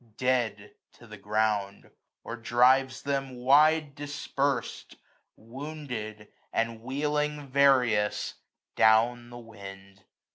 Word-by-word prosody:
Dead 115 Hz, -5 st, -1 dB, 0.2 s
to -, -, -17 dB
the -, -, -11 dB
ground; 105 Hz, -2 st, -2 dB, 0.3 s
or 115 Hz, -, -6 dB
drives 130 Hz, +3 st, +2 dB
them 135 Hz, -2 st, -2 dB
wide 145 Hz, +4 st, +4 dB
dispers'd. 145 Hz, -2 st, -3 dB, 0.4 s
Wounded, 120 Hz, -4 st, -7 dB, 0.2 s
and 115 Hz, 0 st, -2 dB
wheeling 150 Hz, +3 st, -2 dB
various, 130 Hz, -6 st, +2 dB, 0.4 s
down 115 Hz, +2 st, +3 dB
the 120 Hz, -, -10 dB
wind. 100 Hz, -4 st, -12 dB
120 Hz, 95 wpm, -28 LUFS, 110-140 Hz, 0.4 s, wide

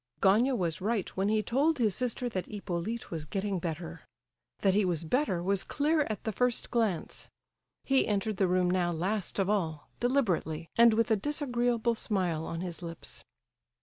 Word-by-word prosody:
Gania 225 Hz, +7 st, +4 dB
was 170 Hz, -5 st, -1 dB
right 210 Hz, -1 st, 0 dB
when 195 Hz, +2 st, +1 dB
he 215 Hz, 0 st, +2 dB
told 285 Hz, +9 st, +2 dB
his 220 Hz, -6 st, +2 dB
sister 250 Hz, +3 st, -1 dB
that 185 Hz, -5 st, -3 dB
Hippolyte 205 Hz, +2 st, -4 dB
was 160 Hz, -3 st, -3 dB
getting 195 Hz, +4 st, -2 dB
better; 165 Hz, 0 st, -5 dB, 0.6 s
that 195 Hz, -2 st, +4 dB
he 210 Hz, +2 st, +3 dB
was 170 Hz, -3 st, 0 dB
better 185 Hz, -, 0 dB
was 195 Hz, +1 st, +1 dB
clear 300 Hz, +1 st, +1 dB
at 215 Hz, -, -4 dB
the 220 Hz, -, -1 dB
first 250 Hz, +3 st, 0 dB
glance. 220 Hz, -8 st, -1 dB, 0.5 s
He 270 Hz, -1 st, +3 dB
entered 210 Hz, 0 st, -1 dB
the 190 Hz, -, +3 dB
room 180 Hz, 0 st, +2 dB
now 180 Hz, -1 st, +1 dB
last 185 Hz, +4 st, -1 dB
of 195 Hz, -2 st, +1 dB
all, 165 Hz, -8 st, -1 dB
deliberately, 185 Hz, -, 0 dB
and 235 Hz, -1 st, +6 dB
with 230 Hz, 0 st, +1 dB
a -, -, +6 dB
disagreeable 240 Hz, -2 st, 0 dB
smile 180 Hz, -8 st, -1 dB
on 165 Hz, 0 st, -4 dB
his 180 Hz, -2 st, -5 dB
lips. 165 Hz, -1 st, -8 dB
200 Hz, 175 wpm, -30 LUFS, 175-235 Hz, 0.6 s, and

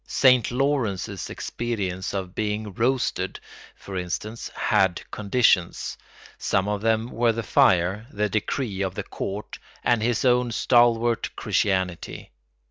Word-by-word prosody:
Saint 125 Hz, -3 st, +4 dB
Lawrence's 120 Hz, -, -1 dB
experience 100 Hz, -6 st, -3 dB
of 95 Hz, -2 st, -4 dB
being 105 Hz, -1 st, -2 dB
roasted, 125 Hz, +5 st, 0 dB, 0.4 s
for 100 Hz, -, -9 dB
instance, 105 Hz, +5 st, -4 dB
had 95 Hz, -2 st, +2 dB
conditions; 100 Hz, -4 st, +1 dB, 0.4 s
some 95 Hz, +1 st, +1 dB
of 105 Hz, -1 st, -1 dB
them 115 Hz, +1 st, +1 dB
were 115 Hz, 0 st, +2 dB
the 115 Hz, +1 st, -3 dB
fire, 95 Hz, +3 st, +3 dB
the 105 Hz, -4 st, -1 dB
decree 105 Hz, 0 st, -2 dB
of 95 Hz, -2 st, -2 dB
the -, -, -3 dB
court, 100 Hz, +2 st, -6 dB, 0.2 s
and 120 Hz, -2 st, +2 dB
his 120 Hz, +3 st, 0 dB
own 125 Hz, -1 st, +3 dB
stalwart 120 Hz, -1 st, +3 dB
Christianity. 95 Hz, -3 st, -1 dB
110 Hz, 125 wpm, -25 LUFS, 95-120 Hz, 0.4 s, Saint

